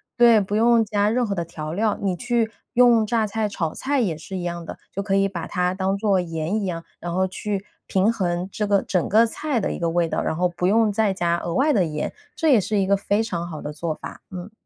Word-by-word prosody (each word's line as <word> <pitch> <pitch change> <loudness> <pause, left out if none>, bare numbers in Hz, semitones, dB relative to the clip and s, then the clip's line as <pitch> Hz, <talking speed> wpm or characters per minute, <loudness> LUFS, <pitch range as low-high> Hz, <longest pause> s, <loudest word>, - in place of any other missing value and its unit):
对， 235 -2 +6
不 205 0 -2
用 230 +1 +4
加 205 -1 +1
任 245 +2 +1
何 205 - -2
的 170 -3 -2
调 155 -2 -6
料， 210 +3 +1
你 195 -2 -1
去 235 +1 0 0.2
用 240 -2 +5
榨 220 0 +1
菜 215 0 -1
炒 165 -5 -2
菜 280 +1 -1
也 195 -10 0
是 185 +5 -7
一 175 - -4
样 170 -1 -4
的， - - -7 0.2
就 200 - -2
可 195 -1 0
以 195 0 +3
把 175 -4 -5
它 180 0 0
当 190 +1 -1
作 200 -3 +2
盐 165 +4 -2
一 - - -2
样， 170 -3 -4 0.2
然 175 - -5
后 185 +2 +1
去 200 +1 -4 0.2
平 195 +4 +2
衡 175 -3 -1
这 210 +1 -2
个 200 -1 +3
整 180 -4 0
个 220 +3 +5
菜 270 +3 -2
的 200 - -1
一 - - -5
个 170 -1 0
味 170 0 +1
道， - - -1
然 160 - -2
后 180 - +3
不 180 0 -2
用 220 +2 +3
再 210 0 +2
加 170 -2 0
额 170 0 -4
外 295 +6 +3
的 200 -7 +3
盐， 150 -1 -3 0.2
这 320 - +1
也 245 -7 +6
是 210 +3 -1
一 195 - +2
个 200 +1 +3
非 205 +2 0
常 175 -6 -3
好 160 -3 -7
的 150 - -5
做 155 +1 -3
法， - - -9
嗯。 185 +2 -8
195 Hz, 280 characters per minute, -23 LUFS, 175-220 Hz, 0.2 s, 对